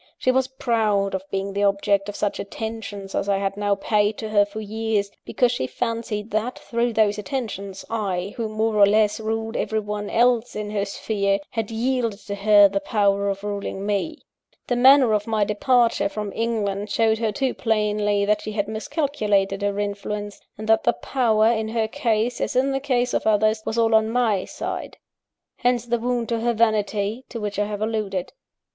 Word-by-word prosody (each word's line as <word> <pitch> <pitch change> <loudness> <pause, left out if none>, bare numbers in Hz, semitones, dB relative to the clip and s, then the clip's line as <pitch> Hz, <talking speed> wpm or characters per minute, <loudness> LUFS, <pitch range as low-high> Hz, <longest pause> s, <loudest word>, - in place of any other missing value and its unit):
She 255 - +2
was 260 0 +1
proud 220 -6 0
of 190 - -1
being 195 0 -3
the 200 - -1
object 200 0 +2
of 205 - -6
such 205 - -2
attentions 205 -2 -6
as 200 - -1
I 200 - +3
had 195 0 -2
now 205 0 +1
paid 210 +1 +1
to 220 - -5
her 205 -1 +4
for 205 +2 -8
years, 215 -1 -2
because 245 -2 +2
she 245 - -2
fancied 230 - -3
that, 220 +4 -1
through 235 0 -1
those 210 -1 +2
attentions, 205 -6 -5
I, 200 -4 -2
who, 225 -2 -3
more 215 0 0
or 200 -1 +7
less, 210 +1 +3
ruled 225 +1 -3
everyone 210 -1 -2
else 240 0 +2
in 210 -1 -4
her 205 -1 -1
sphere, 200 -1 0
had 225 -3 -3
yielded 230 -1 -1
to 200 - -4
her 205 0 +6
the 195 0 -1
power 200 -1 +1
of 195 0 -4
ruling 200 -1 -4
me. 210 +10 -1 0.5
The 245 - 0
manner 260 -1 +6
of 210 0 0
my 220 -2 +1
departure 230 +1 +2
from 210 0 -5
England 210 -3 -2
showed 220 +1 +2
her 225 -2 0
too 260 +5 -1
plainly 210 -2 +1
that 210 0 +1
she 215 - -5
had 205 -1 -1
miscalculated 215 -6 -1
her 200 0 -1
influence, 205 0 -4 0.2
and 215 +1 -7
that 220 0 +4
the 240 - +3
power, 225 -5 +1
in 220 -2 -1
her 220 0 0
case, 235 -2 -1
as - - -2
in 265 +2 +2
the 270 - 0
case 250 -3 0
of - - 0
others, 215 +1 +3
was 225 - -2
all 225 -1 +3
on 220 0 +4
my 225 -5 +1
side. - - -5 0.6
Hence 245 -1 +1
the 240 0 0
wound 240 0 -1
to 230 -1 0
her 235 +1 +1
vanity, 215 0 0
to 235 - -6
which 205 -1 -3
I 205 - +2
have 210 0 -3
alluded. 210 -5 -2
215 Hz, 190 wpm, -23 LUFS, 205-230 Hz, 0.6 s, or